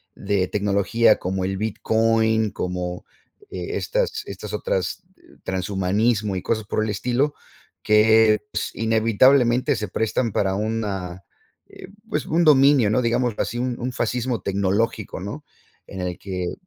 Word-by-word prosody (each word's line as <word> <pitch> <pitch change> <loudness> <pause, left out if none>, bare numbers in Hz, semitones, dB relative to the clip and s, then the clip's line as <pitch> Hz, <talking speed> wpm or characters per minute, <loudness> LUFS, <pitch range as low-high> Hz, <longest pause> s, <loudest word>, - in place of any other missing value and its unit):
de 100 -2 -1
tecnología 105 +2 +2
como 95 +1 -2
el 95 0 -2
bitcoin, 110 +1 +1
como, 90 -2 -4 0.4
eh, - - -5
estas - - -1
estas - - -8
otras 485 - -2 0.4
transhumanismo 100 +2 0
y - - -4
cosas 110 -1 -1
por 110 - -1
el 110 - -2
estilo, 125 +8 0 0.5
que, 110 0 +5
pues, - - -3
inevitablemente 120 +4 +3
se 105 -4 -4
prestan 110 +3 -1
para 95 -1 0
una, 100 -4 -3 0.4
eh, - - -12 0.2
pues, - - -2
un 170 +2 +2
dominio, 140 -5 +5
¿no? 110 +4 +2
Digámoslo 120 -1 0
así, 120 - -3
un, 125 0 -2
un 125 +1 -3
fascismo 120 0 -2
tecnológico, 100 +3 -1
¿no? 105 +11 -7 0.4
En 95 - -8
el 90 -1 -3
que, 90 -3 -4
110 Hz, 135 wpm, -22 LUFS, 100-120 Hz, 0.5 s, que